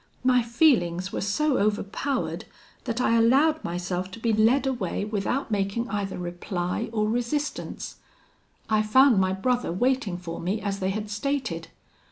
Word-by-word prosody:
My 255 -1 +4
feelings 220 - +2
were - - -2
so 260 +8 +1
overpowered, 210 +6 -1 0.4
that 230 +1 -2
I 230 -2 +3
allowed 290 +7 +4
myself 180 +1 -3
to 230 - -8
be 230 -1 +1
led 230 +6 +3
away 230 -7 -2
without 215 +5 -2
making 205 +3 -1
either 200 -2 -3
reply 175 +4 -3
or 215 -2 0
resistance. 245 +6 -3 0.7
I 215 -1 +3
found 235 +1 +5
my 185 0 +1
brother 245 +4 0
waiting 235 -1 0
for 175 -2 -6
me 190 +5 -1
as 200 -2 -3
they 190 -1 0
had 210 +1 -3
stated. 215 -8 -2
215 Hz, 150 wpm, -26 LUFS, 190-250 Hz, 0.7 s, found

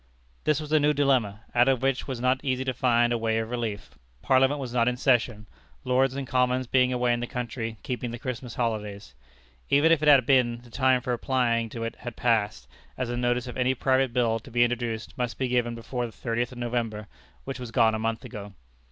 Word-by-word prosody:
This 150 -2 +2
was 155 -1 -7
a 155 - +5
new 150 +1 +3
dilemma, 130 -8 +1
out 120 +1 +4
of 130 -1 +2
which 135 -1 +1
it - - -13
was 130 -3 -4
not 130 +2 +1
easy 130 -2 -1
to 130 - -1
find 120 -1 +2
a 120 - -1
way 110 0 0
of 115 +1 -3
relief. 105 - -5 0.2
Parliament 135 +2 +3
was 130 -3 -5
not 120 -1 +2
in 125 0 0
session, 120 -5 +1 0.4
Lords 130 +1 +2
and 140 -1 -3
Commons 125 0 +1
being 125 +1 +2
away 125 -1 +1
in 120 - -1
the 120 - -3
country 120 -3 -4
keeping 125 -1 -3
the 120 - -6
Christmas 125 -2 -6
holidays. 105 - -3 0.6
Even 150 +4 +4
if 165 -2 +4
it 155 - 0
had 140 -4 +7
been, 120 -3 +2
the 120 - -17
time 130 0 +2
for 125 -1 -2
applying 120 -2 0
to 115 +1 -6
it 115 - -5
had 120 -2 -7
passed, 105 - 0 0.3
as 125 -2 -2
a - - -2
notice 120 0 0
of 125 - -7
any 130 +1 +1
private 130 0 +1
bill 115 -2 +1
to 115 - -14
be 120 0 +3
introduced 120 -2 -2
must 120 -1 -2
be 130 - -1
given 120 -1 0
before 120 +1 -4
the - - -11
thirtieth 120 +2 -2
of 125 - -11
November, 115 -3 -3 0.4
which 120 - -6
was 125 -2 -6
gone 115 -2 +3
a 110 - -2
month 115 +2 -2
ago. 105 -4 -9
120 Hz, 230 wpm, -26 LUFS, 115-130 Hz, 0.6 s, had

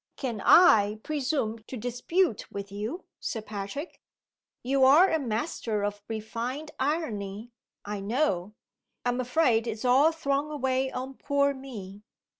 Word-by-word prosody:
"Can 235 -7 -4
I 215 - +6
presume 275 -6 -1
to 260 - -6
dispute 245 - -1
with 200 0 -6
you, 215 - -5
Sir 230 - -3
Patrick? 210 - -6 0.6
You 265 +2 +2
are 300 +9 +7
a 320 - +2
master 225 -4 -2
of 205 0 -3
refined 235 +7 -4
irony, 235 -7 -2 0.3
I 205 0 -4
know. 205 - -1 0.5
I - - +2
am 245 +1 0
afraid 245 -3 +2
it's 225 +2 -4
all 270 +6 +5
thrown 295 -2 -1
away 265 -2 0
on 260 +2 -5
poor 280 0 +1
me." 210 -8 -9
250 Hz, 135 wpm, -28 LUFS, 215-285 Hz, 0.6 s, are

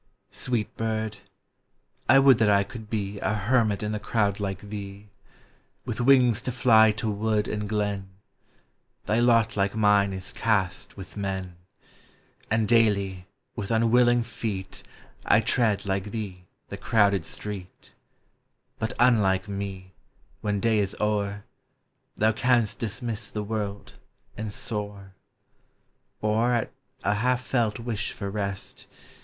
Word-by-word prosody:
Sweet 120 -4 -2
bird! 110 -1 -2 0.9
I 130 - +8
would 135 -3 +6
that 110 -2 +4
I 100 -1 +4
could 110 -1 -10
be 100 -2 -3
A 110 - 0
hermit 110 -1 +1
in 105 - -2
the 105 - -2
crowd 105 -1 0
like 95 -2 -3
thee! 100 0 -8 0.8
With - - -3
wings 125 -3 +5
to 125 - -3
fly 110 -3 +5
to 105 +1 -4
wood 105 0 0
and 105 -1 -3
glen. 100 -2 -2 1.0
Thy 110 +2 +1
lot, 115 -2 +3
like 100 0 0
mine, 105 -2 +4
is 95 0 -6
cast 100 -5 -1
with 95 -3 -10
men; 95 -3 -4 0.9
And 110 -1 +1
daily, 100 -5 +2 0.3
with 105 -4 -5
unwilling 120 +1 +4
feet, 100 -4 -5 0.5
T - - +6
tread, 105 -5 +1
like 95 0 -1
thee, 100 -4 -6 0.2
the - - -6
crowded 100 -4 +2
street, 100 -3 -8 0.9
But, 110 +2 -2
unlike 105 -6 +3
me, 100 -2 -6 0.5
when 105 -1 -1
day 110 0 +2
is 100 -2 -1
o'er, 105 -1 -1 0.7
Thou 110 +1 +3
canst 120 -1 +1
dismiss 115 0 -3
the 105 - -4
world, 100 -1 -4 0.4
and 110 0 -5
soar: 100 -2 -4 1.1
Or, 110 +3 +2
at 115 - -1 0.3
a 105 - +2
half 125 +4 0
felt 115 -5 0
wish 115 -3 -3
for 100 -2 -5
rest. 100 -1 -5
105 Hz, 135 wpm, -26 LUFS, 100-115 Hz, 1.1 s, I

